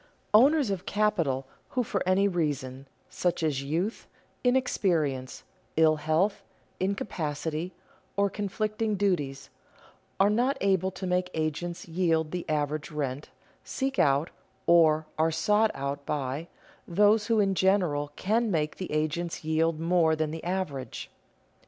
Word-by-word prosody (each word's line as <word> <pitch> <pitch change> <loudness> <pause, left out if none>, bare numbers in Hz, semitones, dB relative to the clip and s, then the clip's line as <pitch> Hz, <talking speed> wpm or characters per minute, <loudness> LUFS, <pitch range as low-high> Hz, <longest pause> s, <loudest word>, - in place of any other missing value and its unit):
Owners 270 +2 +5
of 190 0 -4
capital 170 -11 +1 0.3
who 250 - +4
for 200 -3 -2
any 190 +2 +4
reason, 140 -7 -2 0.2
such 175 -2 -1
as 145 -4 0
youth, 165 +10 -2 0.4
inexperience, 170 - 0 0.3
ill 160 -1 +5
health, 160 +7 +1 0.4
incapacity, 165 -4 -2 0.5
or 200 0 +4
conflicting 215 +2 -2
duties, 175 -9 -1 0.7
are 200 +2 +5
not 250 +6 +1
able 190 -1 +2
to 190 0 -7
make 180 0 0
agents 160 +3 -3
yield 165 -2 +1
the 180 -1 -4
average 150 -1 -1
rent, 145 -2 -4 0.3
seek 270 0 -2
out, 140 +4 +3 0.3
or 160 -2 +5
are 160 +1 +4
sought 210 +7 +2
out 140 +1 -3
by, 140 +2 -3 0.4
those 210 +4 +3
who 225 -2 +3
in 195 -2 +3
general 175 -7 +1
can 225 +4 +1
make 155 -5 -1
the 185 - -5
agents 155 +3 -2
yield 160 0 +1
more 165 -1 +3
than 155 -1 -1
the 160 - -6
average. 175 -8 -4
170 Hz, 130 wpm, -28 LUFS, 150-200 Hz, 0.7 s, Owners